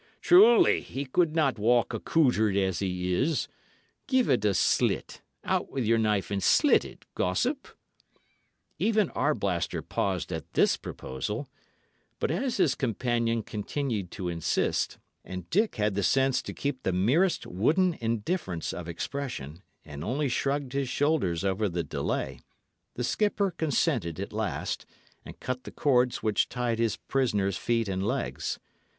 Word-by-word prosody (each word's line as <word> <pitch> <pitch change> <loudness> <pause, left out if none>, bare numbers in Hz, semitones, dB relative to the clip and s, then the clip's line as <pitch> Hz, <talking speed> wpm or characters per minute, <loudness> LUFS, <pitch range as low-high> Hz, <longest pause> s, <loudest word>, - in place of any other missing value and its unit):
"Truly, 240 - +6
he 140 +2 -5
could 155 +4 +1
not 140 -8 +2
walk 120 +2 +3
accoutred 110 -10 +2
as 95 -3 +1
he 90 -2 -1
is. 140 - +1 0.6
Give 260 - +2
it 120 -5 +2
a 100 -2 +2
slit - - +1 0.2
out - - 0
with 130 -4 -2
your 115 +1 +3
knife 105 -3 0
and 100 -1 -1
slit - - +5
it, - - -12
gossip." 250 - 0 1.1
Even 215 -4 +2
Arblaster 100 - -1
paused 95 -4 -2
at - - -6
this - - +4
proposal; 105 - -5 0.7
but - - -1
as 265 -3 -1
his 175 -8 +3
companion 115 -1 0
continued 105 -2 -3
to 90 - -5
insist, 85 -2 0 0.3
and 90 -2 -7
Dick 215 +4 +2
had 105 -1 +1
the 100 - -1
sense 135 +6 +2
to - - -7
keep 140 -2 -3
the 95 - 0
merest 135 - +2
wooden 165 - +2
indifference 115 - -2
of 85 -2 -6
expression, 85 - -5 0.2
and 75 0 -8
only 135 - -1
shrugged 135 +1 -1
his 140 -2 -1
shoulders 130 - +1
over 100 +2 0
the 85 -1 -2
delay, 65 -5 -3 0.6
the 125 - -3
skipper 205 - +1
consented 140 - 0
at - - -5
last, - - -3 0.4
and - - -11
cut 130 0 -4
the - - -9
cords 125 -3 +2
which 110 -2 +1
tied 120 -2 -1
his 115 -2 +1
prisoner's 105 -8 0
feet 115 -2 0
and 95 -1 -2
legs. 105 - -2
115 Hz, 145 wpm, -28 LUFS, 95-145 Hz, 1.1 s, Truly